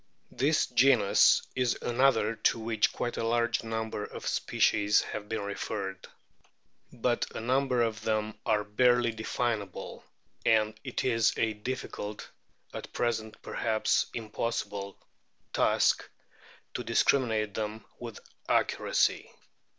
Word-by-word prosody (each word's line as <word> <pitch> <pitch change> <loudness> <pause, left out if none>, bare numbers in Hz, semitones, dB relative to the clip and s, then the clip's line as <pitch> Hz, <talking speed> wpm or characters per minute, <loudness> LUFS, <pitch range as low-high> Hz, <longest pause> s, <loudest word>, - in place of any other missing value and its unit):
This 145 +6 +2
genus 125 -5 +4
is 125 -2 +1
another 120 -3 +3
to 110 - +2
which 110 -2 +1
quite 120 - -3
a - - -1
large 115 0 +1
number 110 -2 -3
of - - -8
species 105 0 +2
have 105 -1 -6
been 110 - -2
referred. 100 -1 -4 0.8
But - - 0
a - - -3
number 125 +1 +1
of 110 -1 -2
them 110 0 -1
are 105 -1 +1
barely 120 +3 +3
definable, 110 -2 -3 0.4
and 110 -1 +3
it - - -3
is 115 -3 +2
a 110 -1 +1
difficult 105 -2 -5 0.5
at - - -7
present 110 -2 -2
perhaps 110 -2 +1
impossible 105 -3 -3 0.6
task - - +2 0.6
to - - -3
discriminate 110 -6 +2
them 110 +1 -4
with 115 -3 -7 0.3
accuracy. - - +1
110 Hz, 115 wpm, -29 LUFS, 105-120 Hz, 0.8 s, genus